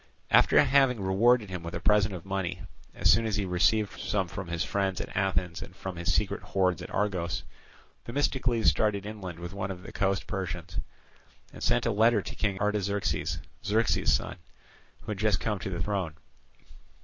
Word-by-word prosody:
After -, -, +6 dB
having 135 Hz, -4 st, +4 dB
rewarded 105 Hz, +3 st, +3 dB
him 90 Hz, -2 st, -4 dB
with 85 Hz, 0 st, -6 dB
a -, -, -3 dB
present 105 Hz, -1 st, +3 dB
of 85 Hz, -, -9 dB
money, 95 Hz, -3 st, -3 dB, 0.3 s
as -, -, +1 dB
soon 115 Hz, +2 st, +2 dB
as 105 Hz, -, -1 dB
he 105 Hz, -2 st, 0 dB
received 100 Hz, +4 st, +1 dB
some 95 Hz, -3 st, -1 dB
from 95 Hz, +1 st, -6 dB
his 85 Hz, -1 st, -1 dB
friends 95 Hz, -2 st, -1 dB
at -, -, -6 dB
Athens 90 Hz, -3 st, 0 dB
and 90 Hz, -, -9 dB
from 95 Hz, -1 st, -6 dB
his 85 Hz, 0 st, -1 dB
secret -, -, 0 dB
hoards 90 Hz, -3 st, 0 dB
at -, -, -7 dB
Argos, 95 Hz, -4 st, -1 dB, 0.6 s
Themistocles 125 Hz, -3 st, 0 dB
started 105 Hz, -2 st, +2 dB
inland 100 Hz, -5 st, -6 dB
with 85 Hz, +2 st, -7 dB
one 100 Hz, 0 st, -3 dB
of 90 Hz, -2 st, -6 dB
the -, -, -9 dB
coast 95 Hz, +2 st, 0 dB
Persians, 90 Hz, -3 st, -4 dB, 0.7 s
and -, -, -11 dB
sent -, -, +2 dB
a -, -, +2 dB
letter 110 Hz, 0 st, +3 dB
to -, -, -7 dB
King 100 Hz, -3 st, -1 dB
Artaxerxes, 100 Hz, -1 st, 0 dB, 0.3 s
Xerxes's 110 Hz, +3 st, +2 dB
son, -, -, 0 dB, 0.6 s
who -, -, -6 dB
had 100 Hz, -, -4 dB
just 110 Hz, 0 st, +2 dB
come 105 Hz, -3 st, -1 dB
to 95 Hz, -, -4 dB
the 85 Hz, -2 st, -3 dB
throne. 95 Hz, -6 st, -2 dB
95 Hz, 185 wpm, -28 LUFS, 90-105 Hz, 0.7 s, After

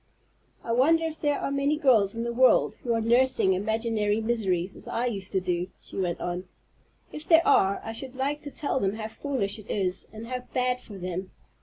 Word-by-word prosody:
"I 230 Hz, -, -3 dB
wonder 310 Hz, +8 st, +4 dB
if 320 Hz, -1 st, -5 dB
there 290 Hz, -1 st, +1 dB
are -, -, -2 dB
many 280 Hz, +2 st, +1 dB
girls 230 Hz, -9 st, +3 dB
in 230 Hz, -, -2 dB
the 235 Hz, 0 st, -2 dB
world 255 Hz, +2 st, +4 dB
who 240 Hz, -, 0 dB
are 225 Hz, -, 0 dB
nursing 240 Hz, -3 st, +3 dB
imaginary 215 Hz, +1 st, 0 dB
miseries 195 Hz, -6 st, -1 dB
as -, -, -9 dB
I 235 Hz, -, -1 dB
used 200 Hz, -5 st, -3 dB
to 190 Hz, -, +3 dB
do," 180 Hz, -1 st, -1 dB
she -, -, -13 dB
went 180 Hz, -3 st, -1 dB
on. 180 Hz, +1 st, -3 dB, 0.7 s
"If 300 Hz, +1 st, -8 dB
there 335 Hz, 0 st, +6 dB
are, 195 Hz, +1 st, +4 dB
I 225 Hz, -, -5 dB
should 255 Hz, +3 st, -6 dB
like 285 Hz, +3 st, -1 dB
to 290 Hz, -, -7 dB
tell 285 Hz, -1 st, -2 dB
them 195 Hz, -3 st, 0 dB
how 220 Hz, 0 st, -5 dB
foolish 225 Hz, -6 st, -2 dB
it 215 Hz, -, -14 dB
is, 190 Hz, -2 st, -2 dB
and 220 Hz, +1 st, -8 dB
how 250 Hz, +1 st, -3 dB, 0.2 s
bad 250 Hz, 0 st, +1 dB
for 205 Hz, -5 st, -11 dB
them. 185 Hz, +1 st, -4 dB
225 Hz, 210 wpm, -27 LUFS, 195-260 Hz, 0.7 s, there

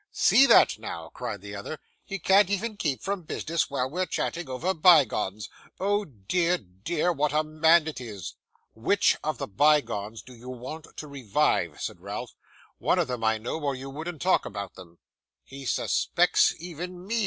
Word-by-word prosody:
'See 270 Hz, +2 st, +5 dB
that -, -, +6 dB
now!' -, -, -6 dB
cried -, -, -6 dB
the -, -, -8 dB
other. -, -, -6 dB, 0.3 s
'He 195 Hz, -, -5 dB
can't 195 Hz, 0 st, +4 dB
even 210 Hz, +3 st, -1 dB
keep 145 Hz, -9 st, -2 dB
from 195 Hz, -1 st, -2 dB
business 165 Hz, -1 st, -2 dB
while 130 Hz, -2 st, -1 dB
we're 180 Hz, +6 st, -2 dB
chatting 170 Hz, -5 st, -3 dB
over 160 Hz, +9 st, -1 dB
bygones. 120 Hz, -, +4 dB, 0.3 s
Oh 205 Hz, +2 st, +1 dB
dear, 170 Hz, -, 0 dB
dear, 150 Hz, -, -2 dB
what 150 Hz, -1 st, 0 dB
a 155 Hz, +1 st, +3 dB
man 155 Hz, +1 st, +4 dB
it 155 Hz, -5 st, -5 dB
is!' 105 Hz, -6 st, -7 dB, 0.4 s
'WHICH 120 Hz, -, +2 dB
of 155 Hz, -3 st, -2 dB
the -, -, -3 dB
bygones 115 Hz, -5 st, +1 dB
do 130 Hz, -, -13 dB
you 120 Hz, +1 st, -11 dB
want 130 Hz, +6 st, -7 dB
to 155 Hz, -, -6 dB
revive?' 130 Hz, -, 0 dB
said -, -, -5 dB
Ralph. -, -, -6 dB, 0.5 s
'One -, -, +2 dB
of -, -, +1 dB
them, 125 Hz, -2 st, -3 dB
I 110 Hz, 0 st, +3 dB
know, 120 Hz, +8 st, -4 dB
or 140 Hz, -3 st, -1 dB
you 135 Hz, +1 st, -7 dB
wouldn't 160 Hz, +2 st, -6 dB
talk 185 Hz, -, +3 dB
about 100 Hz, -2 st, -6 dB
them.' 85 Hz, -2 st, -14 dB, 0.5 s
'He 135 Hz, -1 st, -9 dB
suspects -, -, +2 dB
even 175 Hz, +2 st, -7 dB
me! 230 Hz, +3 st, -1 dB
150 Hz, 175 wpm, -27 LUFS, 120-175 Hz, 0.5 s, that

